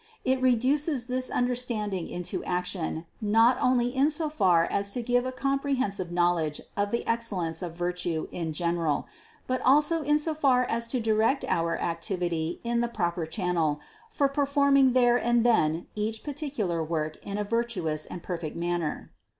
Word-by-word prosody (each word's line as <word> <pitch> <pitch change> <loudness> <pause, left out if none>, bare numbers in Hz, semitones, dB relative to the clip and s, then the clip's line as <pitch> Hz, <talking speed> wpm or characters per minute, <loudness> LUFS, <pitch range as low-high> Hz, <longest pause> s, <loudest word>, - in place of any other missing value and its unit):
It 260 0 +1
reduces 260 +3 +2
this 255 0 -2
understanding 235 -7 -1
into 175 -1 -4
action, 180 -2 -2 0.2
not 225 +4 +4
only 245 0 +2
in 275 +3 +4
so 310 0 -1
far 180 - +3
as 200 +2 -1
to 245 - -3
give 245 +1 +1
a - - -2
comprehensive 270 -9 -1
knowledge 175 -3 +1 0.2
of 205 0 0
the 235 - -2
excellence 195 -8 -1
of 170 -2 -5
virtue 175 -2 -2
in 165 -2 -3
general, 170 -2 -1 0.4
but 255 0 -1
also 300 +5 +4
in 295 0 +3
so 310 +1 0
far 270 -5 +3
as 235 0 0
to 250 +2 -1
direct 225 +4 +1
our 165 0 0
activity 170 -1 -2
in 235 0 0
the 240 - +1
proper 175 -7 -2
channel 165 -4 0 0.3
for 290 -10 +1
per 275 0 0
forming 280 -2 +4
there 245 -1 +4
and 240 -1 +2
then 165 -8 +2
each 215 +1 -3
particular 265 - -2
work 155 -1 -3
in 200 0 -4
a 210 - 0
vir 230 +3 +1
tuous 160 -9 -3
and 175 - -7
perfect 170 -4 -4
manner. 170 -2 -3
220 Hz, 165 wpm, -27 LUFS, 175-255 Hz, 0.4 s, not